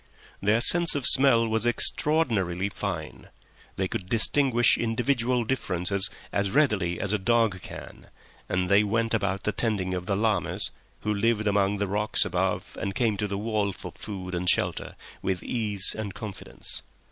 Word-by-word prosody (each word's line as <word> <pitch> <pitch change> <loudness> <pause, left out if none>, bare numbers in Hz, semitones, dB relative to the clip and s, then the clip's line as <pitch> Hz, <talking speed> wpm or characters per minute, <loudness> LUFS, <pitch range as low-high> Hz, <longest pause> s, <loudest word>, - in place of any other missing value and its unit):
Their 105 +3 +2
sense 170 +6 +7
of 140 -3 -1
smell 130 -4 +5
was 110 +1 0
extraordinarily 110 - +2
fine; 90 -6 -6 0.5
they 95 - -2
could 90 0 -6
distinguish 120 +1 +4
individual 120 +1 0
differences 100 -6 0 0.2
as 100 -1 -1
readily 105 - +1
as 105 0 -2
a 105 - 0
dog 110 -2 +1
can, - - -11 0.4
and 90 0 -1
they 100 +2 +4
went 115 +2 -1
about 100 -3 -1
the 105 - -1
tending 100 -4 -2
of 90 +1 -5
llamas, 100 -1 0 0.3
who 105 - -1
lived 110 +1 0
among 100 0 +1
the 100 - -1
rocks 105 +2 0
above - - -2
and 95 - -4
came 115 -4 +1
to 105 - -2
the 100 0 -4
wall 105 -2 -2
for - - -9
food 95 -3 -8
and 90 0 +1
shelter, 90 -6 0 0.3
with 95 -2 -3
ease 105 -5 +1
and 105 -3 -6
confidence. 105 -4 -4
105 Hz, 160 wpm, -26 LUFS, 95-115 Hz, 0.5 s, sense